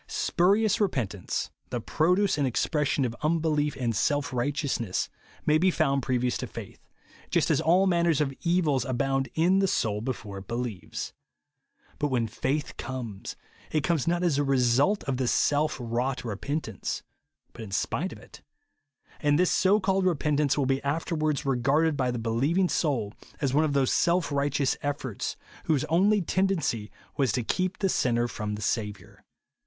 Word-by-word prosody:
Spurious 200 +5 +2
repentance, 115 - -1 0.2
the - - -2
j)roduce 180 +5 +2
and 140 - +2
expression 145 +2 +1
of 120 -1 -3
unbelief 155 -2 +1
and 120 -3 0
self 145 +5 0
righteousness, 125 -5 -1 0.4
may 155 +1 +4
be 185 +3 +4
found 140 -5 +1
previous 125 -1 0
to - - -4
faith; - - -9 0.3
— - - -25
just - - +2
as - - +2
all 180 +5 +4
manner 170 -2 +2
of 150 -3 +1
evils 165 -7 +2
abound 135 0 0
in 180 +4 +3
the 195 - +3
soul 105 - 0
be 130 +4 -1
fore 100 -4 -8
it 95 - -13
believes. 115 -7 -4 0.9
But 150 - +1
when 125 -4 +1
faith 135 +6 -2
comes, 120 -6 -6 0.4
it 155 -2 +1
comes 165 -3 0
not 175 +1 +1
as 165 -6 +2
the 145 - +2
result 135 - +2
of 135 -2 -2
this 125 -2 +1
self 150 +1 +2
wrought 125 +2 -2
repentance, 115 - -3 0.2
— - - -47
but - - -10
in 110 - -7
spite 145 - -1
of - - -9
it; - - -15 0.8
and 145 0 +3
this 180 +1 +3
so 190 +3 +4
called 190 -1 +1
repentance 150 -4 +1
will 140 - +2
be 135 +1 +1
afterwards 155 0 -1
regarded 140 +5 +2
by 130 -2 0
the 120 - -2
believing 135 +11 +1
soul 120 -10 0 0.3
as 135 -3 0
one 155 +3 +4
of 145 - -1
those 135 -2 +2
self 175 -2 +2
righteous 140 -1 +1
efforts, 140 -6 -3 0.3
whose 155 -3 +1
only 195 +6 +3
tendency 165 - 0 0.3
was 135 -5 +2
to 125 - 0
keep 185 +9 -1
the 195 - +1
sinner 120 -8 +1
from 105 -3 -4
the 105 - -6
Saviour. 105 -3 -3
140 Hz, 170 wpm, -27 LUFS, 125-165 Hz, 0.9 s, may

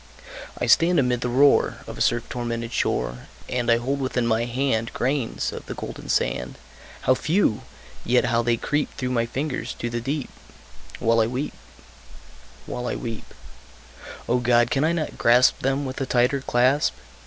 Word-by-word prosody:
I - - -1
stand 175 +1 +4
amid 125 -3 +2
the 125 - -1
roar 135 +3 +4
Of - - -8
a - - -7
surf 120 -1 +1
tormented 115 -1 -4
shore, - - -1 0.2
And 120 -1 -1
I 115 - +5
hold 135 +4 -2
within 130 -2 -1
my 115 0 +1
hand 120 -2 -1
Grains 130 -2 -1
of - - -8
the - - -5
golden - - -8
sand 60 - -1 0.4
How 130 - +4
few! 155 - +1 0.4
yet 125 +1 +3
how 120 -1 +2
they 120 0 +1
creep 145 +5 -1
Through 125 -1 -3
my 115 -2 +1
fingers 135 +3 -3
to 120 - -4
the 120 0 -2
deep 140 +2 -3 0.7
While 115 -1 +2
I 110 - +3
weep 130 +5 -3 1.1
while 125 0 -4
I - - -2
weep! 115 -3 -6 1.0
O 125 +1 +2
God! 120 -1 +3
can 135 - +2
I 160 - +3
not 165 -3 -3
grasp 120 +2 +5
Them 135 +2 0
with 130 +1 -5
a 135 - -1
tighter 125 +3 +2
clasp? 130 +3 +2
125 Hz, 175 wpm, -24 LUFS, 120-135 Hz, 1.1 s, I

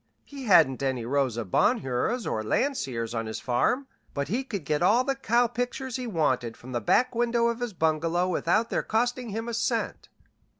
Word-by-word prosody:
He 275 -2 -9
hadn't 150 - +5
any 130 -4 -1
Rosa 125 -3 0
Bonheurs 215 - +1
or 110 - -1
Landseers 125 - -1
on 115 -1 -2
his 110 - -4
farm, 245 - +1 0.3
but 140 0 -2
he 240 +7 0
could 200 - -5
get 150 +2 0
all 220 +8 +4
the 275 +1 0
cow 245 -2 +2
pictures 245 +2 -3
he 250 -1 -4
wanted 130 - 0
from 130 - -11
the 120 -2 -2
back 250 - +2
window 235 0 +2
of 235 0 -3
his 240 -3 -3
bungalow 165 +2 +1
without 185 +5 +1
their - - +1
costing 245 +2 -1
him 225 +3 -4
a 235 - -3
cent. 230 0 -2
200 Hz, 185 wpm, -27 LUFS, -, 0.3 s, hadn't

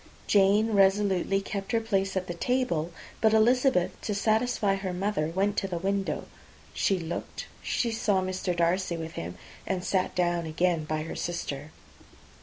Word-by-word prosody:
Jane 205 +2 +4
resolutely 195 -1 +3
kept 195 +2 -5
her 230 - +4
place 195 -4 0
at 185 - -1
the 175 - -4
table; 175 -5 0 0.3
but 220 -1 +5
Elizabeth, 245 -3 +4
to 210 - -2
satisfy 215 0 +2
her 195 -2 -3
mother, 185 -4 0
went 195 +5 0
to 195 - 0
the 180 -2 -3
window 195 +2 -1 0.5
she 195 - +1
looked 165 -1 -5 0.2
she 235 - 0
saw 210 -3 +1
Mr. 185 -1 -2
Darcy 170 +1 +1
with 160 0 -5
him, 85 - -6 0.3
and 185 -2 -1
sat 185 -1 0
down 175 -2 +1
again 165 0 +1
by 155 0 -2
her 160 - -6
sister. 150 -4 -4
190 Hz, 160 wpm, -28 LUFS, 175-205 Hz, 0.5 s, but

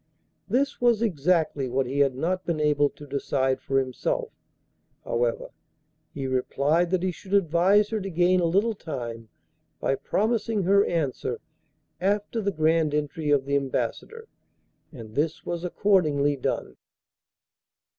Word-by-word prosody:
This 275 +1 0
was 235 -2 +3
exactly 160 - +1
what 130 +2 0
he 135 +3 -3
had 135 -2 +3
not 180 +7 -1
been 170 -3 -2
able 145 -1 +3
to 145 - -13
decide 135 -1 -1
for 135 - -1
himself; 130 -2 -1 0.7
however, 120 0 -1 0.6
he 135 - -5
replied 140 +6 +1
that 185 0 0
he 185 - +1
should 190 +3 -4
advise 195 +3 +3
her 220 -2 -2
to 195 - -4
gain 180 +1 +3
a 175 - +2
little 200 +7 +2
time 120 - -6 0.5
by - - +1
promising 220 - 0
her 200 +3 +4
answer 155 -7 -2 0.6
after 205 +4 0
the 200 -1 0
grand 160 -2 +2
entry 150 +1 -2
of 140 -2 +3
the 140 0 0
Ambassador, 445 - -3 0.6
and 115 -8 -10
this 150 +5 -1
was 170 0 -3
accordingly 155 -7 +2
done. 130 - -3
160 Hz, 140 wpm, -26 LUFS, 140-195 Hz, 0.7 s, her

